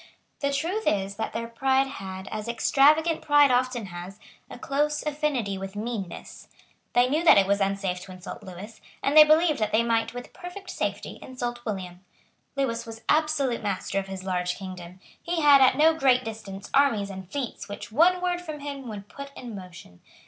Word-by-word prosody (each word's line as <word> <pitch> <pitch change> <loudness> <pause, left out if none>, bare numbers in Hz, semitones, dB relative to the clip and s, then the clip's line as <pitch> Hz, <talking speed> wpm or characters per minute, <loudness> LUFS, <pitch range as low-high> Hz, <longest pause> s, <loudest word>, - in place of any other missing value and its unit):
The 280 -1 0
truth 340 +10 -2
is 195 -1 +1
that 220 - -3
their 230 0 -4
pride 265 +3 +2
had, 190 -7 -7
as 215 +1 -4
extravagant 300 +7 +3
pride 290 -2 +5
often 250 -2 +1
has, 185 +2 -9 0.3
a - - -9
close 295 +2 -1
affinity 285 -10 -1
with 195 +1 -7
meanness. 210 -4 -6 0.5
They 245 +1 +4
knew 305 +6 0
that 340 - +8
it 195 - +5
was 200 +1 +1
unsafe 195 -2 -1
to 185 - -11
insult 185 0 -9
Lewis; 195 +4 -10 0.2
and 280 - +1
they 310 - +12
believed 310 -1 +4
that 215 -1 0
they 225 +2 +3
might 230 0 0
with 245 - -8
perfect 370 +2 -9
safety - - -4
insult 240 -2 -5
William. 185 -4 -5 0.5
Lewis 265 -4 -1
was 225 0 -9
absolute 305 -6 +2
master 195 -1 -2
of 195 - -6
his 190 -1 -7
large 180 -1 -1
kingdom. 185 -1 -9 0.2
He 340 -1 -2
had 285 -2 +7
at 260 0 +5
no 315 +2 +6
great 260 -5 +3
distance 205 -3 -8
armies 230 -8 +3
and 190 -1 -9
fleets 265 -7 -5
which 205 - -7
one 355 +9 +4
word 355 -1 0
from 310 -4 -7
him 280 -2 -6
would 205 -2 -7
put 280 +3 -9
in 240 -3 -8
motion. 175 - -11
235 Hz, 185 wpm, -26 LUFS, 195-285 Hz, 0.5 s, they